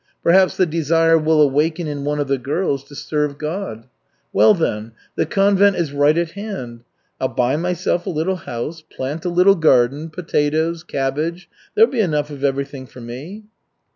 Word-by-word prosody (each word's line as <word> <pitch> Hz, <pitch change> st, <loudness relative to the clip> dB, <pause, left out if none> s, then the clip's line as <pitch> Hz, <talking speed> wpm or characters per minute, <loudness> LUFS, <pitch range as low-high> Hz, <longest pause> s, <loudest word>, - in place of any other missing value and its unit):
Perhaps 185 Hz, +2 st, +4 dB
the 185 Hz, -, +4 dB
desire 165 Hz, 0 st, +2 dB
will 160 Hz, 0 st, +2 dB
awaken 150 Hz, +4 st, +2 dB
in 145 Hz, -2 st, -4 dB
one 150 Hz, +1 st, -1 dB
of 145 Hz, -, -1 dB
the 135 Hz, -1 st, 0 dB
girls 140 Hz, +1 st, -1 dB
to 145 Hz, -, -14 dB
serve 150 Hz, -1 st, -2 dB
God. 155 Hz, -, -5 dB, 0.5 s
Well, 215 Hz, -, +6 dB
then, 110 Hz, -, -2 dB, 0.2 s
the -, -, 0 dB
convent 200 Hz, 0 st, +3 dB
is 160 Hz, -5 st, -2 dB
right 145 Hz, +2 st, +3 dB
at 170 Hz, -1 st, 0 dB
hand. 190 Hz, -, -7 dB, 0.4 s
I'll 130 Hz, -, +1 dB
buy 125 Hz, +1 st, 0 dB
myself 175 Hz, +1 st, -1 dB
a -, -, 0 dB
little 175 Hz, +3 st, -1 dB
house, 155 Hz, +3 st, -6 dB
plant 150 Hz, +2 st, -6 dB
a -, -, +1 dB
little 180 Hz, +3 st, +5 dB
garden, 145 Hz, -2 st, +2 dB
potatoes, 160 Hz, 0 st, -1 dB
cabbage 155 Hz, +4 st, -3 dB, 0.3 s
there'll 445 Hz, +1 st, +5 dB
be 240 Hz, -, +1 dB
enough 150 Hz, -6 st, -1 dB
of 140 Hz, -1 st, -8 dB
everything 140 Hz, -1 st, -2 dB
for 125 Hz, -, -14 dB
me." 135 Hz, -, -8 dB
155 Hz, 170 wpm, -20 LUFS, 140-175 Hz, 0.5 s, Well